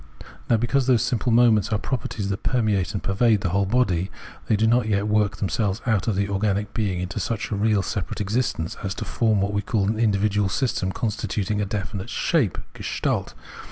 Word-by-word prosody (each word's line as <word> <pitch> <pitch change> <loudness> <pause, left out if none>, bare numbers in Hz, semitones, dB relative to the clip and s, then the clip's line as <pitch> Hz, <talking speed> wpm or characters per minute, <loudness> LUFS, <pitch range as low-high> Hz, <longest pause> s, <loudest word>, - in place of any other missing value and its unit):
Now 115 - +5
because 125 +3 +1
those 125 -3 +4
simple 120 0 0
moments 115 -2 +4
are 110 - +2
properties 110 -4 -3
that 100 - -3
permeate 110 -6 +1
and 100 - -3
pervade 105 +1 +2
the 95 - 0
whole, 100 +3 +1
they 95 -6 +1 0.5
do 110 +2 +2
not 120 0 +3
yet 100 -1 +1
work 105 0 +1
themselves 100 0 -1
out 110 -5 +1
of 110 - +1
the 100 +1 0
organic 100 +1 -1
being 100 -5 -1
into 90 -1 -4
such 115 -1 -3
a - - 0
real 105 -1 +2
separate 100 -2 -3
expression 105 -5 -1
as 95 -2 -3
to - - -5
form 110 -4 +1
what 100 +1 -1
we 100 - +1
call 100 -1 0
an 110 +1 -1
indi 105 -3 +3
vidual 105 -1 +1
system 100 -3 -1
constituting 105 -1 -2
a 100 - -1
definite 100 +1 -4
shape 125 - +1 0.2
{Gestalt). - - -2
105 Hz, 195 wpm, -24 LUFS, 100-115 Hz, 0.5 s, Now